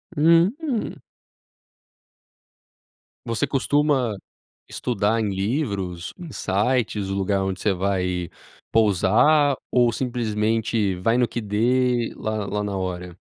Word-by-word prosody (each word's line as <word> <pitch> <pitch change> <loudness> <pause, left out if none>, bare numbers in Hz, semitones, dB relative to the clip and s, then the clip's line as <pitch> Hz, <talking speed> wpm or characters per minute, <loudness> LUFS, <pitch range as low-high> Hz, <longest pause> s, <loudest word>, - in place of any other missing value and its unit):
Hum. 195 - +2 2.2
Você 115 +4 0
costuma 140 -4 +1 0.5
estudar 115 -1 0
em 110 - 0
livros, 95 - -2
em 170 -4 -8
sites, 105 0 0
o 95 - -2
lugar 100 0 0
onde 95 0 -3
você 105 - +2
vai 90 -1 -1 0.4
pousar, 115 - +4 0.2
ou 120 -2 +3
simplesmente 110 -3 0
vai 115 +6 +1
no 125 -1 +2
que 120 - -4
dê, 120 +3 +1
lá 110 -2 -3
lá 105 +1 -2
na 100 -1 -3
hora? 90 -1 -5
110 Hz, 110 wpm, -23 LUFS, 95-125 Hz, 2.2 s, pousar